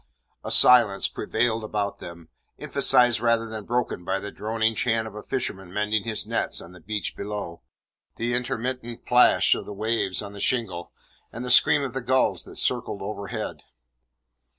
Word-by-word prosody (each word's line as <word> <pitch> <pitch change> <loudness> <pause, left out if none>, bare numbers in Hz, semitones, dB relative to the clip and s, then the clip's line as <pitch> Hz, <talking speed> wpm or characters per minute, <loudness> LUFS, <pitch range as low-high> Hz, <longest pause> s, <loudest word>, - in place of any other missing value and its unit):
A - - -5
silence 115 -6 +6
prevailed 115 -1 -1
about 105 -1 -3
them, 85 -1 -10 0.3
emphasized 120 -2 +3
rather 115 0 +1
than 110 -2 -7
broken 120 -6 -2
by 95 - -1
the 100 - -7
droning 110 +1 -1
chant 110 0 0
of 110 - -10
a 105 - -8
fisherman 95 -9 -4
mending 105 +1 -1
his 110 -2 -2
nets - - -1
on 85 - -11
the 90 - -14
beach 105 +5 -4
below, 100 -4 -6 0.5
the 120 +1 -2
intermittent 120 0 -3
plash 125 0 +5
of - - -5
the 105 - -6
waves 110 -2 -1
on 100 0 -8
the 100 - -8
shingle, 105 -9 -1 0.4
and 120 +2 -6
the 125 - -1
scream 140 +3 +6
of 130 -3 -4
the 135 - -3
gulls 130 +1 +1
that - - -12
circled 100 - -1
overhead. 100 0 -5
110 Hz, 170 wpm, -25 LUFS, 100-120 Hz, 0.5 s, silence